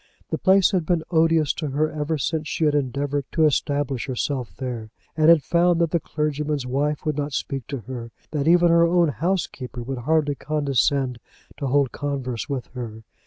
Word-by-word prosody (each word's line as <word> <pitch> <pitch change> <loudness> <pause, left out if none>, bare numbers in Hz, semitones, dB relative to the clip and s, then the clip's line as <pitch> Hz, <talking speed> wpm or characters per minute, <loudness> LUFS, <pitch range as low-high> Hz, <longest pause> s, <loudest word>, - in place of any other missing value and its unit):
The - - -1
place 190 0 +5
had 185 -4 +1
been 165 0 0
odious 160 -3 +3
to 155 - -4
her 150 +3 0
ever 155 +1 -2
since 155 +2 -2
she 160 - 0
had 150 - +3
endeavoured 140 0 -1
to 160 - +4
establish 145 -3 0
herself 130 -1 -2
there 120 -4 -5 0.3
and 155 0 +4
had 165 -4 +6
found 175 0 +3
that 170 -2 +1
the 170 - +2
clergyman's 150 -3 -2
wife 145 +5 -1
would 155 -2 0
not 145 -1 -2
speak 135 -2 -3
to 140 -4 -5
her, 120 0 -7 0.2
that 150 -1 -1
even 175 +1 +5
her 170 0 +5
own 170 -1 +3
housekeeper 155 -7 -2
would 130 +1 -4
hardly 150 +2 +1
condescend 140 -3 0 0.4
to 140 - -3
hold 140 0 +2
converse 135 -5 -4
with 135 -3 -3
her. 115 -3 -7
145 Hz, 185 wpm, -23 LUFS, 135-160 Hz, 0.4 s, had